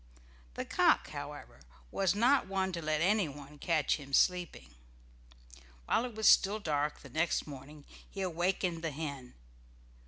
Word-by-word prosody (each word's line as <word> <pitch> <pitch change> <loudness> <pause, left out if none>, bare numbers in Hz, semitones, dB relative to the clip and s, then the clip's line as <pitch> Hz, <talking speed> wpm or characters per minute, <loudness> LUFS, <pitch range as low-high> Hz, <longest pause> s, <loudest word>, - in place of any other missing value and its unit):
The - - -4
cock, - - +3
however, - - -8 0.3
was 195 0 +1
not 245 +5 +3
one 190 -1 -1
to 170 -2 -4
let 155 0 0
anyone 150 -7 -1
catch 155 -3 +1
him 140 -2 -12
sleeping. 175 - +1 1.1
While 235 - +1
it 240 -3 -7
was 220 0 +2
still 200 +2 +5
dark 150 -7 -2
the - - -12
next 160 +2 0
morning, 145 +1 -11 0.2
he 195 - -6
awakened 175 -1 -1
the 165 - 0
hen. 140 -4 -6
165 Hz, 145 wpm, -32 LUFS, 145-190 Hz, 1.1 s, still